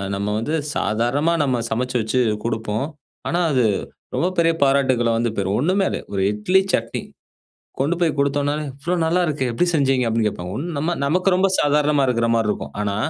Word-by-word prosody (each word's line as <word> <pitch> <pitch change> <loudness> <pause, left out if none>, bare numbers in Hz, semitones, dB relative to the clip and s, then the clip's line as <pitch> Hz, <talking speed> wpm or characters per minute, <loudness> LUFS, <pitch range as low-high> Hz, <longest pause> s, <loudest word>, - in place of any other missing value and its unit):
நம்ம 100 +1 -2
வந்து 130 +8 -3 0.2
சாதாரணமா 120 +10 +1
நம்ம 130 -3 +1
சமச்சு 125 +3 -2
வச்சு 110 +4 0 0.3
குடுப்போம். 110 +3 -2 0.4
ஆனா 170 - 0
அது 130 -3 +2 0.5
ரொம்ப 175 - +1
பெரிய 165 0 +3
பாராட்டுக்கள 130 -4 +2
வந்து 115 +1 +1
பெரும். 100 0 0
ஒண்ணுமே 190 +4 +2
இல்ல - - -2 0.2
1 95 - 0
இட்லி, 180 - +2
சட்னி. 115 0 -1 0.8
கொண்டு 145 +6 +2
போய் 170 -2 +3
கொடுத்தோன்னா, 140 +1 +1 0.3
"இவ்ளோ 175 +5 -1
நல்லா. 170 +3 +2
இருக்கே 140 -5 -1
எப்படி 175 +10 +1
செஞ்சீங்க?" 135 -3 +2
அப்படின்னு 110 -1 +1
கேப்பாங்க. 90 -3 -6
ஒண்ணு 165 +4 -4
நம்ம 160 +4 0
நமக்கு 180 +7 +1
ரொம்ப 190 +1 +3
சாதாரணமா 145 -1 +2
இருக்கற 115 -1 +1
மாரி 110 -2 +1
இருக்கும். - - -4
ஆனா 100 -1 -1
135 Hz, 175 wpm, -21 LUFS, 115-155 Hz, 0.8 s, பெரிய